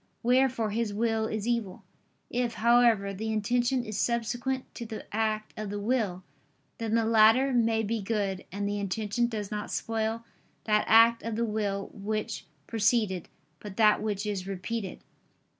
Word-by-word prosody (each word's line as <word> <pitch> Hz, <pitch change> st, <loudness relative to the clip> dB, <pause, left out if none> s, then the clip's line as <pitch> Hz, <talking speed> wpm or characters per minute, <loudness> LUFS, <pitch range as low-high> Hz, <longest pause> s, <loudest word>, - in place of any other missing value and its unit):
Wherefore 245 Hz, -2 st, +2 dB
his 215 Hz, -1 st, -1 dB
will 225 Hz, 0 st, +1 dB
is 215 Hz, 0 st, -3 dB
evil. 230 Hz, -6 st, -2 dB, 0.5 s
If, 240 Hz, -1 st, -1 dB
however, 230 Hz, -4 st, +4 dB
the 220 Hz, +3 st, -3 dB
intention 240 Hz, +4 st, +1 dB
is 215 Hz, -1 st, -4 dB
subsequent 245 Hz, +2 st, -1 dB
to -, -, -6 dB
the 220 Hz, -1 st, -7 dB
act 215 Hz, -1 st, -1 dB
of 215 Hz, -1 st, -5 dB
the 205 Hz, 0 st, -3 dB
will, 205 Hz, -5 st, -1 dB, 0.6 s
then 225 Hz, -1 st, -1 dB
the 230 Hz, -1 st, +2 dB
latter 225 Hz, +4 st, +5 dB
may 225 Hz, -2 st, +2 dB
be 220 Hz, +1 st, -1 dB
good: 195 Hz, -2 st, -2 dB
and 200 Hz, +1 st, -2 dB
the 205 Hz, 0 st, -2 dB
intention 210 Hz, +4 st, -1 dB
does 210 Hz, -4 st, -5 dB
not 210 Hz, 0 st, -4 dB
spoil 225 Hz, 0 st, -2 dB, 0.4 s
that 210 Hz, -1 st, +2 dB
act 230 Hz, +1 st, +6 dB
of 230 Hz, -1 st, -4 dB
the 235 Hz, +1 st, 0 dB
will 205 Hz, -2 st, -2 dB
which 215 Hz, +2 st, -4 dB, 0.2 s
preceded, 215 Hz, -5 st, +1 dB, 0.3 s
but 205 Hz, -2 st, -9 dB
that 215 Hz, -2 st, +5 dB
which 210 Hz, -1 st, -2 dB
is 195 Hz, -3 st, -3 dB
repeated. 195 Hz, +2 st, -4 dB
220 Hz, 160 wpm, -28 LUFS, 205-230 Hz, 0.6 s, act